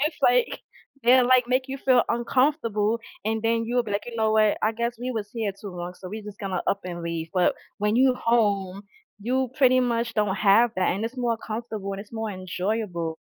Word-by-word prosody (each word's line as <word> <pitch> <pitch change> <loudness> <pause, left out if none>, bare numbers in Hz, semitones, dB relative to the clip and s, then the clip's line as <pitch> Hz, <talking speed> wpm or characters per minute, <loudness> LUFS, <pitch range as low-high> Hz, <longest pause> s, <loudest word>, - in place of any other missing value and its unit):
it's 300 +3 0
like, - - +3 0.4
they'll, 250 +1 +6
like, 255 -1 +4
make 255 +1 +2
you 270 - -4
feel 255 -2 +4
uncomfortable 235 -3 +1 0.2
and 220 0 -1
then 230 0 +1
you'll 245 +2 +1
be 220 - -8
like, 200 - -1
"You 240 -1 -7
know 220 -1 +2
what, 215 -1 +4
I 215 - +2
guess 235 +1 -2
we 250 +1 -3
was 220 -4 -4
here 220 -4 -2
too 205 - -8
long, 175 0 -6
so 185 - -10
we're 215 +3 -6
just 210 -1 -10
gonna 190 -3 -3
up 200 - +1
and 175 -1 -6
leave," 165 -1 -4
but 180 -1 +3 0.2
when 210 +2 +1
you're 260 0 +4
home, 200 -5 +1 0.4
you 255 +4 -1
pretty 255 -1 +5
much 235 -1 -1
don't 210 -3 +1
have 215 +4 +5
that 185 - +2
and 200 +4 -3
it's 235 +3 -5
more 240 -2 0
comfortable 220 -3 -5
and 195 - -5
it's 205 +2 -13
more 220 -1 -3
enjoyable. 185 -2 -3
220 Hz, 215 wpm, -25 LUFS, 200-240 Hz, 0.4 s, they'll